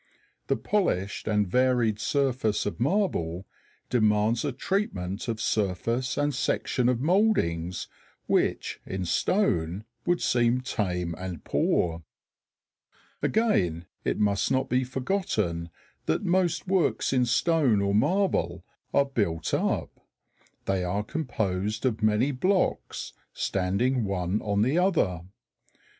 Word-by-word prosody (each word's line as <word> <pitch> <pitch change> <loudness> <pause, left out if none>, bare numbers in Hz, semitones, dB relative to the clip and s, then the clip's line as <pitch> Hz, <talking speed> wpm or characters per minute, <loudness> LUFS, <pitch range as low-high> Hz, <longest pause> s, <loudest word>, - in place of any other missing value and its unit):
The - - +1
polished 110 - -1
and 105 -2 +2
varied 120 -1 +2
surface 130 -4 0
of 105 - -3
marble 115 - 0 0.5
demands 110 -1 +2
a 145 - -1
treatment 115 - -2
of 115 -2 -2
surface 110 +5 -1
and 145 0 +1
section 125 -1 0
of 125 -1 0
mouldings 135 - +1 0.4
which - - 0
in 95 -1 -4
stone 90 - 0 0.2
would 175 0 +3
seem 120 +1 +2
tame 90 -8 -2
and 90 -4 -6
poor. 85 -1 +1 1.2
Again, 90 - +1 0.2
it - - 0
must 100 -1 +1
not 130 0 +1
be 130 +1 +2
forgotten 125 - -1 0.4
that 80 - +1
most 175 -1 +1
works 185 -6 +1
in 125 -2 +2
stone 140 -3 +3
or 100 0 +1
marble 190 - +1 0.3
are 140 - +5
built 100 -12 -1
up. - - -1 0.7
They 95 -2 0
are 100 +4 -1
composed 110 - -2
of 115 -3 0
many 110 +6 +3
blocks 185 +9 0 0.2
standing 105 +7 0
one 95 0 -1
on 105 0 +1
the 135 +9 +2
other. 160 - +1
115 Hz, 120 wpm, -27 LUFS, 95-140 Hz, 1.2 s, are